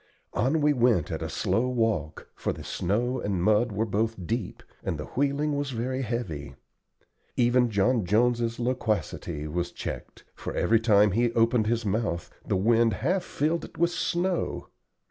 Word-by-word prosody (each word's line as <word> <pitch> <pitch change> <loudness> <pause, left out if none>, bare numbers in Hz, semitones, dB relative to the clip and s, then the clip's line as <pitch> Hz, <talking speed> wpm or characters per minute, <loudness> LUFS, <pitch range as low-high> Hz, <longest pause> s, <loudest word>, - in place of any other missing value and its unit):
On 140 +7 +1
we 150 0 +4
went 120 - +2
at - - -3
a - - -3
slow 120 +3 0
walk, 115 - -1
for - - -2
the - - -9
snow 120 +8 -1
and 95 -4 -1
mud 110 +4 +3
were 105 +2 0
both 110 -2 -1
deep, 115 0 -3 0.2
and 80 - -2
the 75 - -5
wheeling 145 +2 0
was 145 -1 -2
very 130 +2 -2
heavy. 90 - -4 0.8
Even 120 0 +4
John 110 +3 +2
Jones's 115 +4 +1
loquacity 110 - -2
was 85 +3 -2
checked, - - -7
for - - -6
every 115 0 +3
time 105 -2 +4
he 120 +4 +2
opened 115 -1 +3
his 115 0 0
mouth 100 -4 -1
the - - 0
wind 115 +3 +3
half 185 +4 +2
filled 160 +4 -1
it - - -11
with 170 +1 +2
snow. 175 +1 -1
115 Hz, 165 wpm, -27 LUFS, 100-125 Hz, 0.8 s, we